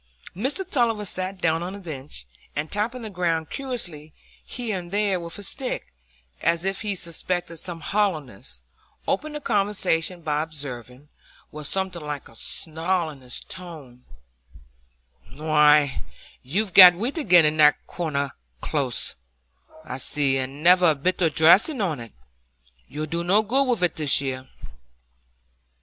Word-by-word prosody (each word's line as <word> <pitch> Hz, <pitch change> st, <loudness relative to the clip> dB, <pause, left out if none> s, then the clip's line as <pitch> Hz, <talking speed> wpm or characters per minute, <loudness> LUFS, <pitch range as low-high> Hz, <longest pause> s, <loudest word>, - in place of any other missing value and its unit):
Mr 280 Hz, -, -2 dB
Tulliver 230 Hz, -, 0 dB
sat 185 Hz, 0 st, -3 dB
down 165 Hz, -2 st, +1 dB
on 180 Hz, +2 st, -5 dB
the -, -, -7 dB
bench, 145 Hz, -, -7 dB, 0.3 s
and 150 Hz, +2 st, -3 dB
tapping 230 Hz, +4 st, -2 dB
the 220 Hz, -, -5 dB
ground 165 Hz, -4 st, -1 dB
curiously 175 Hz, -, -5 dB, 0.3 s
here 225 Hz, -6 st, -4 dB
and 175 Hz, -1 st, -10 dB
there 200 Hz, -1 st, 0 dB
with 170 Hz, -1 st, -4 dB
his 205 Hz, -, -4 dB
stick, 265 Hz, -, -4 dB, 0.5 s
as 170 Hz, +1 st, +1 dB
if 195 Hz, 0 st, -1 dB
he 210 Hz, -3 st, -2 dB
suspected 175 Hz, 0 st, -3 dB
some 170 Hz, 0 st, -6 dB
hollowness, 150 Hz, -, -2 dB, 0.5 s
opened 300 Hz, +9 st, -1 dB
the -, -, -3 dB
conversation 190 Hz, -, 0 dB
by 150 Hz, -1 st, 0 dB
observing, 140 Hz, -4 st, -8 dB, 0.4 s
with 150 Hz, -1 st, -5 dB
something 190 Hz, -2 st, -2 dB
like 150 Hz, -2 st, -6 dB
a 115 Hz, -, -18 dB
snarl 165 Hz, +5 st, -2 dB
in 140 Hz, -3 st, -14 dB
his 125 Hz, -1 st, -6 dB
tone,— 155 Hz, -9 st, -9 dB, 1.3 s
"Why, 150 Hz, -2 st, +3 dB, 0.4 s
you've 190 Hz, -, -1 dB
got 180 Hz, -2 st, +10 dB
wheat 245 Hz, -, -3 dB
again 180 Hz, -, +6 dB
in 150 Hz, +1 st, +2 dB
that 150 Hz, -1 st, +5 dB
Corner 140 Hz, -5 st, -3 dB, 0.3 s
Close, 135 Hz, -, -1 dB, 0.7 s
I 130 Hz, -2 st, -6 dB
see; 135 Hz, 0 st, +2 dB
and 135 Hz, +3 st, -5 dB
never 180 Hz, 0 st, +6 dB
a 155 Hz, -, +2 dB
bit 180 Hz, +7 st, -1 dB
o' 165 Hz, -, +4 dB
dressing 180 Hz, -, +5 dB
on 170 Hz, -, -1 dB
it. 115 Hz, -1 st, -10 dB, 0.7 s
You'll 150 Hz, +2 st, -4 dB
do 170 Hz, +3 st, -3 dB
no 200 Hz, +5 st, +3 dB
good 265 Hz, +6 st, +2 dB
with 240 Hz, -7 st, +1 dB
it 175 Hz, -, +1 dB
this 150 Hz, -3 st, +5 dB
year." 130 Hz, -1 st, -4 dB
170 Hz, 150 wpm, -24 LUFS, 150-195 Hz, 1.3 s, got